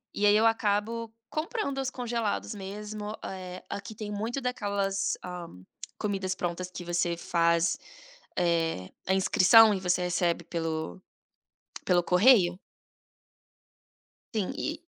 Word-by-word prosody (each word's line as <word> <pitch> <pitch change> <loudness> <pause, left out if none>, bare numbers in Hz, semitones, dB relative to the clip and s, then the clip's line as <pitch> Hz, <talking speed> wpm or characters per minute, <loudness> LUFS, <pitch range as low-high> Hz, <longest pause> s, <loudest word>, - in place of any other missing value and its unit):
e 205 - +1
aí 205 0 +6
eu 225 +1 +5
acabo 225 +1 0 0.2
comprando 310 - -2
os 265 0 -1
congelados 235 -4 -2
mesmo, 210 +2 -6
eh, 185 -1 -7
aqui 200 +2 -6
tem 210 -1 -6
muito 225 +6 -3
daquelas, 200 -5 -1
hã, 180 -2 -6 0.5
comidas 195 -3 -1
prontas 180 +1 -3
que 180 -1 -8
você 175 0 0
faz, 170 0 +2 0.6
eh, 165 - +1 0.2
a 190 - +3
inscrição 210 +3 +7
e 190 - -1
você 180 -1 +1
recebe 175 -1 0
pelo 165 +1 -3 0.8
pelo 180 -1 +3
correio. 180 -1 +5 1.8
Sim, 215 +2 -1
e 315 0 -3
195 Hz, 120 wpm, -28 LUFS, 175-220 Hz, 1.8 s, inscrição